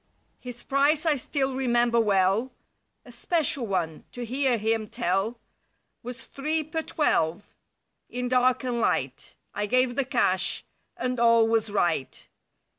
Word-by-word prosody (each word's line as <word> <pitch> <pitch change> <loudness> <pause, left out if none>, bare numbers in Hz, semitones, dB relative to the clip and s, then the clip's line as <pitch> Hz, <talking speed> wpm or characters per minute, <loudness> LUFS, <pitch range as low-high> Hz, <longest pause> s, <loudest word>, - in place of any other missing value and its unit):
His 245 -1 -9
price 285 +3 +2
I 315 - +4
still 270 0 -2
remember 240 -2 +2
well, 205 +3 +2 0.5
(A 245 - -12
"special" 275 -1 -1
one, 170 -5 -2
to 245 -1 -5
hear 260 +1 +1
him 220 0 -1
tell). 195 +7 -1 0.6
Was 250 +2 -7
three 310 +4 -2
per 315 +2 -3
twelve, 205 - -1 0.6
in 250 0 -3
dark 255 +1 +2
and 245 -2 -2
light. - - -1 0.2
I 205 0 -2
gave 255 +2 +2
the 280 - +1
cash - - 0 0.3
and 250 -1 -2
all 230 -1 +5
was 225 -1 +1
right. 170 -9 -1
245 Hz, 135 wpm, -26 LUFS, 220-265 Hz, 0.6 s, all